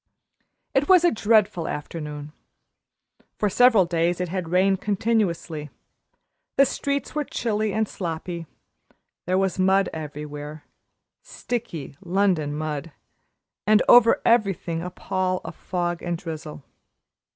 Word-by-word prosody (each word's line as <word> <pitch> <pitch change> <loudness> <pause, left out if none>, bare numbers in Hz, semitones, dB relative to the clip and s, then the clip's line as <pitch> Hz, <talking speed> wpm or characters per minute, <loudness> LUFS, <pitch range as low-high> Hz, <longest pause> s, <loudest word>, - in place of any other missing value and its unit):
It 275 +2 +1
was 365 -2 +7
a 345 - +5
dreadful 210 -6 +2
afternoon. 150 -1 -6 1.1
For 210 -2 0
several 230 -4 +5
days 170 +1 0
it 180 -1 -2
had 180 -2 -3
rained 190 +2 +2
continuously, 195 -8 -1 0.9
the 275 - +7
streets 280 +1 -2
were 300 - 0
chilly 215 -5 -1
and 220 +2 0
sloppy; 170 -2 -5 0.8
there 185 +1 +2
was 190 0 0
mud 190 +1 +3
everywhere 150 -1 -7 0.6
sticky 230 - -5
London 180 -5 +1
mud 155 +1 -4 0.8
and 215 0 +5
over 240 -2 +7
everything 195 -7 +2
a 180 - -4
pall 185 0 -2
of - - -7
fog 175 -2 -3
and 175 -1 -2
drizzle. 155 - -7
180 Hz, 120 wpm, -24 LUFS, 160-215 Hz, 1.1 s, was